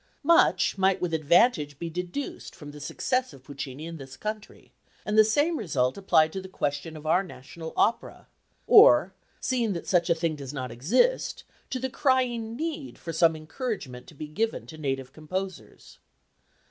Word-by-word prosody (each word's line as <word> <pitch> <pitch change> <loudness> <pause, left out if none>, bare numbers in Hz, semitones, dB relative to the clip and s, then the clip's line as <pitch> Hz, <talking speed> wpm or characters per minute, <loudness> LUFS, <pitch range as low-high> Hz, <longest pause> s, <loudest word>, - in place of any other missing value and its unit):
Much 280 - +4
might 190 0 +3
with 175 -2 -2
advantage 155 - +3
be 170 - -5
deduced 180 - -5
from 145 -1 -10
the 150 - -11
success 255 - -1
of 135 -2 -15
Puccini 140 +1 -7
in 165 0 -7
this 135 -2 -11
country, 215 +3 -7 0.3
and 210 - -1
the 215 - +8
same 290 +10 +2
result 130 - 0
applied 160 -5 +3
to 190 - -4
the 190 - -10
question 150 -1 -3
of 155 - -12
our 165 +4 +3
national 160 -1 -9
opera; 230 - 0 0.4
or, 440 +4 +7 0.3
seeing 240 -5 0
that 170 - -5
such 175 -2 +2
a 170 - +4
thing 165 -1 -1
does 140 -2 -8
not 130 -3 -4
exist, 220 - +1 0.3
to 260 - -2
the 260 +1 -2
crying 250 -4 0
need 315 0 -4
for 165 - -6
some 165 0 +4
encouragement 155 - -5
to 155 - -14
be 150 +2 -7
given 220 +10 -2
to 160 - -11
native 135 -2 -3
composers. 160 - -7
170 Hz, 170 wpm, -27 LUFS, 145-225 Hz, 0.4 s, the